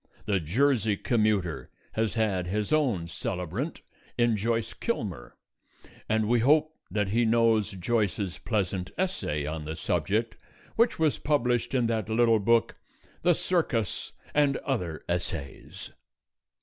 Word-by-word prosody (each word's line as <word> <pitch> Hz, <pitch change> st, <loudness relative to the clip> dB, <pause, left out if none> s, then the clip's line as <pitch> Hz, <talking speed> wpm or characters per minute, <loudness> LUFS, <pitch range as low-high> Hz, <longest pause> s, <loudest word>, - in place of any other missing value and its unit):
The 100 Hz, -3 st, +1 dB
Jersey 110 Hz, -, +2 dB
commuter 100 Hz, -, 0 dB, 0.2 s
has 110 Hz, 0 st, -1 dB
had 100 Hz, -6 st, 0 dB
his 105 Hz, +7 st, -1 dB
own 120 Hz, -, +1 dB
celebrant 100 Hz, -, -4 dB, 0.3 s
in 120 Hz, -2 st, +3 dB
Joyce 115 Hz, +2 st, -1 dB
Kilmer, -, -, -4 dB, 0.7 s
and 110 Hz, -1 st, +2 dB
we 120 Hz, +1 st, +3 dB
hope 155 Hz, +5 st, +3 dB
that 105 Hz, -2 st, 0 dB
he 115 Hz, +4 st, +2 dB
knows 115 Hz, -2 st, +3 dB
Joyce's 100 Hz, -1 st, -1 dB
pleasant 95 Hz, -4 st, -1 dB
essay 180 Hz, -, -1 dB
on 75 Hz, 0 st, -4 dB
the 80 Hz, +1 st, -4 dB
subject 100 Hz, +8 st, -1 dB, 0.4 s
which 230 Hz, +2 st, +3 dB
was 155 Hz, -8 st, +1 dB
published 125 Hz, -4 st, +1 dB
in 125 Hz, -2 st, +2 dB
that 110 Hz, -1 st, -1 dB
little 115 Hz, 0 st, +4 dB
book, 115 Hz, +3 st, +2 dB, 0.4 s
"The 175 Hz, 0 st, +4 dB
Circus 140 Hz, -, -1 dB, 0.2 s
and 145 Hz, -2 st, +3 dB
Other 90 Hz, -, -2 dB
Essays." 85 Hz, -5 st, -4 dB
110 Hz, 125 wpm, -28 LUFS, 95-120 Hz, 0.7 s, little